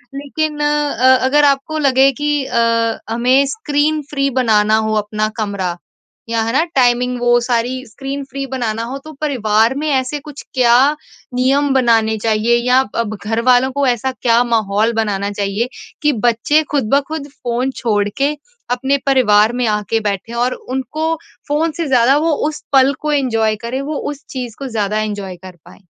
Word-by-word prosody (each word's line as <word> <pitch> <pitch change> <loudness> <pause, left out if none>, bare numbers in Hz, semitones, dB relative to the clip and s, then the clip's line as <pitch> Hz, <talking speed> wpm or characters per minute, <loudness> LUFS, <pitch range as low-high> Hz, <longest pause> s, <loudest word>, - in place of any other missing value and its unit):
लेकिन 295 +2 -3
अ, 295 -3 +3
अगर 290 +3 +3
आपको 280 +2 +1
लगे 270 -1 +4
कि 295 -1 +1
अ, 230 -2 +1
हमें 250 +4 +3
स्क्रीन 300 -5 0
फ्री 275 -1 0
बनाना 215 -3 +3
हो 215 - 0
अपना 215 0 -1
कमरा 195 -5 -2 0.5
या 230 -1 0
है 230 - -1
ना 290 +5 +3
टाइमिंग, 250 -1 +2
वो 240 0 +4
सारी 245 +2 -1
स्क्रीन 270 +5 -6
फ्री 275 0 -4
बनाना 230 -4 -2
हो, 250 +4 -5
तो 310 +3 -11
परिवार 225 -5 +2
में 305 +2 -2
ऐसे 265 +1 0
कुछ 290 -1 -10
क्या 245 -3 +4 0.6
नियम 270 +3 +2
बनाने 225 -4 +2
चाहिए? 225 +1 +2
या 250 +1 +5 0.2
अब 215 -2 -2
घरवालों 245 +4 +2
को 280 +1 0
ऐसा 245 +2 0
क्या 240 -2 +2
माहौल 220 -1 +1
बनाना 205 -3 -1
चाहिए 205 +4 -2 0.3
कि 300 -1 +2
बच्चे 240 +7 +2
खुद 275 -7 0
ब 280 - +5
खुद 310 -2 -5
फ़ोन 250 -1 -3
छोड़ 210 -4 +1
के 280 +2 +1 0.4
अपने 265 +3 +1
परिवार 225 -5 +4
में - - +2
आके 210 +1 0
बैठे 200 +4 -5
और 245 +2 0
उनको 285 +5 -3 0.4
फ़ोन 315 +3 +1
से 335 -3 -2
ज़्यादा 260 +1 +4
वो 325 - +2 0.2
उस 300 - -9
पल 270 +1 +5
को 305 - -1
एन्जॉय 225 -6 +1
करें? 260 +3 -3
वो 295 +1 -4
उस 290 -1 -8
चीज़ 250 -4 -6
को 275 - -5
ज़्यादा 215 -3 -1
एन्जॉय 205 -3 -4
कर 185 -1 -10
पाएँ? 195 - -17
250 Hz, 170 wpm, -17 LUFS, 225-280 Hz, 0.6 s, या